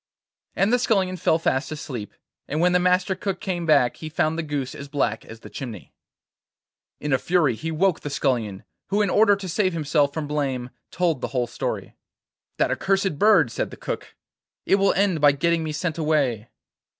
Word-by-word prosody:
And 200 +5 +2
the 250 - +4
Scullion 195 -6 +1
fell 160 -2 +2
fast 135 -4 -1
asleep, 125 -8 -6 0.3
and 150 - -2
when 180 +2 +4
the 180 - +4
Master 180 +2 +2
Cook 190 +1 -3
came 175 -3 -3
back 140 -6 +4
he 155 - -7
found 155 0 0
the 165 - -1
goose 145 -4 -3
as 140 - -8
black 135 -6 -1
as 115 0 -11
the - - -11
chimney. 110 - -8 1.1
In 150 -2 -1
a 130 - +3
fury 170 -6 +2
he 155 +9 -5
woke 175 +2 +1
the 145 - -5
Scullion, 120 -8 -1 0.2
who 205 +1 +2
in 200 - 0
order 205 -1 +5
to 195 -1 -7
save 185 +1 +1
himself 150 -2 +1
from 155 +1 -4
blame 135 -4 -2 0.2
told 170 -6 0
the - - -1
whole 125 - +2
story. 120 - -4 0.6
'That - - +2
accursed 195 -5 0
bird,' 190 - +5
said - - -2
the - - -11
Cook; - - -6 0.5
'it 195 - +4
will 195 0 +3
end 190 -5 +1
by 145 -1 +6
getting 170 +3 +1
me 155 - -3
sent 160 +2 -3
away. 140 -8 0
155 Hz, 195 wpm, -24 LUFS, 135-185 Hz, 1.1 s, by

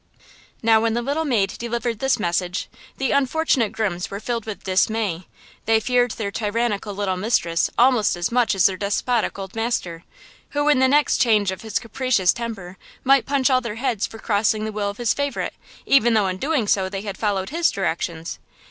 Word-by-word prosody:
Now, 225 -1 +5
when 225 0 +1
the 240 - 0
little 290 +5 -1
maid 220 -9 +1
delivered 235 -1 -3
this 265 0 +2
message, 180 -1 -1 0.3
the 265 -2 0
unfortunate 280 -4 +1
grooms 190 -5 -2
were 200 - -5
filled 230 0 -3
with 215 - -6
dismay–they 205 +2 -1
feared 245 +2 +2
their 200 -3 -4
tyrannical 210 -1 -2
little 190 -2 -1
mistress 175 -5 +1
almost 245 -5 +4
as 175 +3 -2
much 235 -3 +2
as 185 - +3
their 190 -1 +3
despotic 210 +4 -1
old 190 -1 -7
master, 205 -8 -2 0.5
who, 290 0 +2
in 290 -3 +4
the 260 - +5
next 290 +2 +3
change 210 -5 +3
of 190 - -7
his 220 -3 -2
capricious 230 -5 +1
temper, 200 -6 -7 0.2
might 270 -1 +4
punch 275 -1 +2
all 255 0 +3
their 235 -4 -5
heads 235 -4 -1
for 225 - -11
crossing 215 0 0
the 220 - -3
will 205 -1 -2
of 200 - -7
his 240 -2 +1
favorite, 285 0 -2 0.3
even 240 -4 +4
though 210 -2 +3
in 185 -1 -2
doing 275 -1 0
so 190 -2 +1
they 195 0 -4
had 200 -2 -5
followed 200 -1 -1
his 335 +2 +2
directions. 170 -3 -3
220 Hz, 190 wpm, -22 LUFS, 195-245 Hz, 0.5 s, Now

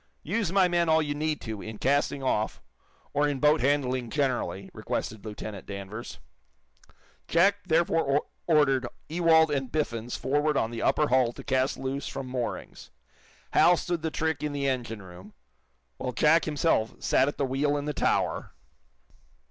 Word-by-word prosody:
"Use 210 -7 -1
my 190 -1 +4
men 175 -1 +1
all 160 0 +5
you 145 -1 -2
need 155 +1 -1
to, 110 -3 -6
in 110 -1 -7
casting 140 +2 +1
off, 110 -4 0 0.5
or 145 +1 +2
in 145 -2 -2
boat 150 +2 +4
handling 130 -3 +1
generally," 120 - -1
requested 110 -1 -4
Lieutenant 105 -2 -7
Danvers. 100 +3 -7 1.1
Jack 195 +5 +4
therefore 160 -4 +2 0.2
ordered 135 -6 +3 0.2
Ewald 160 -1 +4
and 135 -3 -2
Biffens 120 -6 -2
forward 145 +2 +1
on 115 - 0
the 115 -1 -5
upper 150 - +2
hull 125 -2 +3
to - - -10
cast 130 -1 0
loose 135 +1 -3
from 135 - -5
moorings. 125 -2 -5 0.6
Hal 175 0 +5
stood 175 -1 -2
the 160 - -1
trick 160 0 -1
in 150 -1 -2
the 140 -1 -1
engine 120 -5 -3
room, 95 +3 -13 0.6
while 125 -1 -4
Jack 155 +6 +4
himself 150 -7 +1
sat 130 - +2
at 145 - -3
the 140 - +1
wheel 140 +3 0
in 145 - -3
the 150 - -2
tower. - - 0
140 Hz, 160 wpm, -27 LUFS, 120-155 Hz, 1.1 s, all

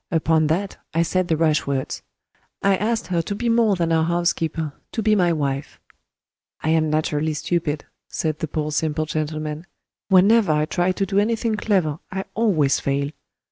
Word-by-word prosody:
Upon 160 -2 +2
that, 190 +6 -1 0.2
I 165 - +4
said 180 +2 0
the 160 - +1
rash 155 -2 +2
words. 135 -1 -2 0.6
I 195 0 +4
asked 220 0 -1
her 175 -1 0
to 200 +5 -4
be 235 +3 -1
more 230 -3 +3
than 170 -2 0
our 160 -1 +3
housekeeper 165 -3 -1 0.2
to 225 - -2
be 215 - +4
my 180 -4 +3
wife. 140 -3 -2 0.8
I 155 - 0
am 160 -1 +2
naturally 155 0 0
stupid," 155 -1 -2 0.2
said 155 -2 -2
the 160 - -2
poor 155 0 -2
simple 155 +1 0
gentleman; 155 +1 -4 0.4
"whenever 195 -1 +5
I 150 0 +2
try 175 +3 0
to 195 +1 -1
do 195 +1 +1
anything 225 +1 0
clever 185 -8 0
I 190 +1 -3
always 170 - +2
fail. 140 +1 -1
165 Hz, 175 wpm, -22 LUFS, 155-195 Hz, 0.8 s, whenever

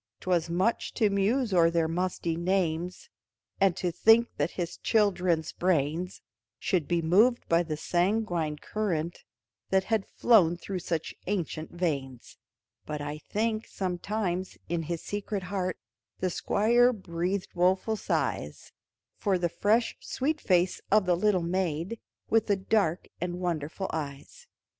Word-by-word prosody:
'Twas 175 -2 +1
much 185 +7 0
to 215 -2 +3
muse 210 +4 +1
o'er 170 -2 +5
their 165 -1 +1
musty 175 0 -1
names, 180 - -1 0.5
And 195 -3 +4
to 180 -2 -1
think 225 +6 +5
that 145 +3 +1
his 175 -1 -3
children's 180 -7 +1
brains 170 0 -1 0.3
Should 170 -6 0
be 170 -1 +1
moved 215 +9 +4
by 165 0 +4
the 155 -3 -3
sanguine 175 -2 0
current, 170 -3 -3 0.5
That 190 0 +3
had 220 -1 0
flown 180 -8 +4
through 190 +1 -4
such 165 -2 -3
ancient 170 -5 -2
veins; 140 -8 -3 0.4
But 150 -1 -5
I 145 +1 -5
think, 220 +5 -2
sometimes, 185 0 -3
in 170 0 -1
his 165 +1 -4
secret 205 -1 -3
heart, 185 0 -2 0.4
The 185 -1 -1
Squire 240 +7 +3
breathed 185 -1 -3
woeful 185 +5 +2
sighs - - -2 0.5
For 195 -3 +2
the 175 -1 0
fresh 220 +7 +1
sweet 300 +4 -2
face 180 -1 +2
of 210 -1 +4
the 180 -1 +3
little 185 -1 +2
maid, 175 +3 -1 0.3
With 225 0 +2
the 205 - +3
dark 190 -3 +1
and 175 0 -3
wonderful 175 +1 -2
eyes. 150 - -6
180 Hz, 140 wpm, -28 LUFS, 170-205 Hz, 0.5 s, o'er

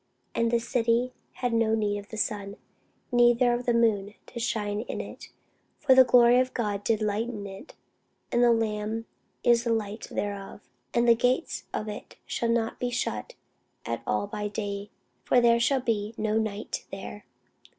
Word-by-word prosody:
And 230 0 +1
the 235 - +3
city 235 +1 +1 0.2
had 245 -2 -2
no 225 -1 +3
need 205 -2 0
of 205 - -12
the 220 - -7
sun, 205 -1 -2 0.5
neither 240 0 +5
of 240 +1 -3
the 240 - +4
moon, 210 -3 +2
to 240 - -8
shine 210 -3 -1
in 240 - -5
it: - - -8 0.5
for 265 - +4
the 260 0 +9
glory 245 0 +6
of 255 0 0
God 205 -4 -1
did 220 +1 +1
lighten 210 0 -2
it, 195 +9 -10 0.6
and 240 - +3
the 240 - +6
Lamb 220 0 -1 0.4
is 235 -1 +4
the 235 - 0
light 215 -1 -2
thereof. 200 0 -4 0.3
And 240 0 +2
the 235 - +8
gates 250 +6 0
of 215 - -3
it 210 0 -7
shall 235 - -1
not 230 -1 0
be 245 - -1
shut 235 - -3 0.5
at 115 0 -3
all 105 -1 +1
by 210 - -4
day: 205 -1 -4 0.3
for 250 - +4
there 235 -1 +5
shall 265 +2 +2
be 220 -2 -1
no 215 0 0
night 215 -1 -4
there. 195 +1 -8
225 Hz, 175 wpm, -27 LUFS, 205-240 Hz, 0.6 s, the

